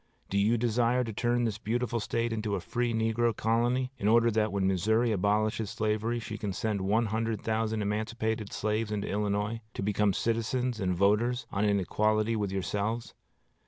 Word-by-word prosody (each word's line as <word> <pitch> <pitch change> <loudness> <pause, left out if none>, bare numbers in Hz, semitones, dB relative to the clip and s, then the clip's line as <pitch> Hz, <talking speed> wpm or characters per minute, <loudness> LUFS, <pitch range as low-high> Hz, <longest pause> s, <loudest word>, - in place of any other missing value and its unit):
Do 100 - +2
you 110 +4 +3
desire 120 +2 +2
to 115 -2 -5
turn 120 +3 +1
this 110 -2 -1
beautiful 120 +2 -1
State 115 +2 -1
into 110 -2 -1
a - - -2
free 120 +6 -1
negro 115 0 +1
colony, 120 +3 +1
in 100 - 0
order 115 +1 +5
that 110 -1 +1
when 100 -1 0
Missouri 110 +6 +2
abolishes 105 +2 +1
slavery 110 +1 -1
she 115 -2 -6
can 100 -3 -3
send 105 +1 -1
one 105 +5 +2
hundred 110 0 -2
thousand 110 -1 0
emancipated 110 +1 -2
slaves 110 0 -1
into 105 -1 -2
Illinois, 105 +2 -1
to - - -3
become 105 0 +2
citizens 115 +3 -1
and 90 -2 0
voters, 115 +6 +2
on 100 +2 0
an 100 -1 +3
equality 110 +4 +1
with 105 -3 -1
yourselves? 100 +5 -2
110 Hz, 175 wpm, -29 LUFS, 105-115 Hz, -, order